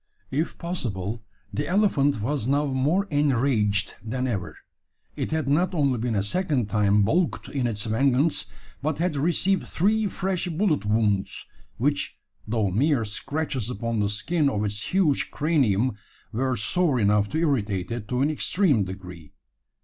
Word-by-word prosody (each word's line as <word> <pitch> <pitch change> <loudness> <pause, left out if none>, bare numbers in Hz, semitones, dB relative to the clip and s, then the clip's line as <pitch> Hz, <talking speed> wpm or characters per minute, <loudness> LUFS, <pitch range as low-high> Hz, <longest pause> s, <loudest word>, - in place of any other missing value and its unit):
If 150 +5 -1
possible, 115 - -3 0.3
the 100 - -2
elephant 155 - +2
was 130 +1 -1
now 145 +2 +2
more 145 +8 +1
enraged 120 - +2
than 125 +3 -2
ever. 100 -7 -3 0.6
It - - -3
had 155 -2 -1
not 175 +6 +2
only 140 -6 +2
been 115 -1 -1
a 100 - +1
second 130 - -1
time 105 0 +3
baulked 165 - 0
in 130 -4 -1
its 105 -3 -2
vengeance, 135 +7 +2 0.4
but 150 +1 -1
had 170 -1 0
received 175 +6 +1
three 210 +4 +1
fresh 185 -1 -2
bullet 165 - 0
wounds; 105 -2 0 0.3
which, 145 +4 -1 0.3
though 105 -3 0
mere 130 - +2
scratches 130 +2 -3
upon 115 -2 -2
the 100 -1 +1
skin 145 +9 +1
of 105 -4 -1
its 105 0 -3
huge 175 -7 +2
cranium, 130 - +2 0.4
were 130 +3 0
sore 145 - +1
enough 105 -1 +3
to 155 - -2
irritate 110 - 0
it 115 -3 -4
to 125 +1 -1
an 145 +3 +2
extreme 155 - +2
degree. 90 -4 -9
130 Hz, 150 wpm, -25 LUFS, 105-155 Hz, 0.6 s, time